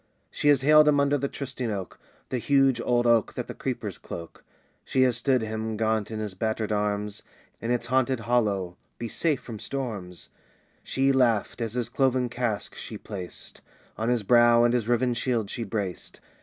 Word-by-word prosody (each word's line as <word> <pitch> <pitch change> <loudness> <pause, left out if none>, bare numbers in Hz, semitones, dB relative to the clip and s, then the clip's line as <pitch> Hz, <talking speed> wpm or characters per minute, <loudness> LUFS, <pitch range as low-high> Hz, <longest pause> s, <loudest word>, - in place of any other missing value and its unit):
She 150 - -1
has 145 -2 +5
haled 155 +1 +7
him 145 -1 +4
under 140 0 +3
the 140 0 0
trysting 130 -3 -5
oak, 100 -4 -5 0.3
The 125 - -1
huge 135 -1 +3
old 120 -1 +2
oak 115 -2 +3
that - - -3
the - - -6
creepers - - -4
cloak. 85 -1 -9 0.4
She 130 - +2
has 125 -2 +3
stood 130 -4 +2
him, 110 0 -3
gaunt 110 -1 0
in 110 - -5
his 105 -3 -3
battered 110 +2 -2
arms, 105 0 -1 0.4
In 115 - -3
its 120 -1 0
haunted 130 0 +1
hollow. 105 -6 0 0.2
"Be 120 - -4
safe 150 +3 0
from 110 -3 -7
storms," 105 -11 -4 0.5
She 135 +1 +1
laughed 120 -3 +2
as 115 -2 -2
his 125 -2 0
cloven 130 -2 +1
casque 120 -4 -2
she - - -7
placed 90 -3 -7 0.3
On 110 +2 -1
his 120 -3 +1
brow, 120 +1 +6
and 120 0 +3
his 120 -3 0
riven 120 +1 +2
shield 115 -3 -1
she 120 - -3
braced. 100 -4 -4
120 Hz, 185 wpm, -26 LUFS, 110-130 Hz, 0.5 s, haled